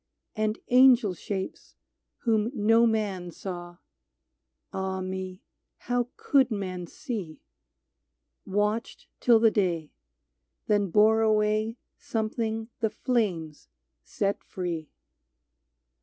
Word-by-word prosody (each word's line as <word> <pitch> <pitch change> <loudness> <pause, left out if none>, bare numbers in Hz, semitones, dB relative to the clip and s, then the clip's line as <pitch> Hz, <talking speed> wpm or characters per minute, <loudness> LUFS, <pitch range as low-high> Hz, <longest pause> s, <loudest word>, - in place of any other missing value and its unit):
And 215 0 0
angel 250 -5 +6
shapes, 190 +1 -6 0.5
whom 220 -2 +2
no 225 +2 +4
man 200 -5 -1
saw 175 0 -7 0.5
— - - -52
Ah 190 0 -2
me! 185 0 -5 0.3
how 245 0 -1
could 270 -3 +3
men 185 -5 -4
see? 195 - -6 0.5
— - - -54
Watched 210 +3 -1
till 235 -2 +5
the 225 -1 +5
day, 175 -7 0 0.7
then 205 -2 +2
bore 215 +4 +5
away 215 +1 +2 0.2
Something 225 0 -2
the 220 - +1
flames 185 - -2 0.4
set 200 - -2
free. 170 -4 -4
210 Hz, 100 wpm, -27 LUFS, 185-225 Hz, 0.7 s, angel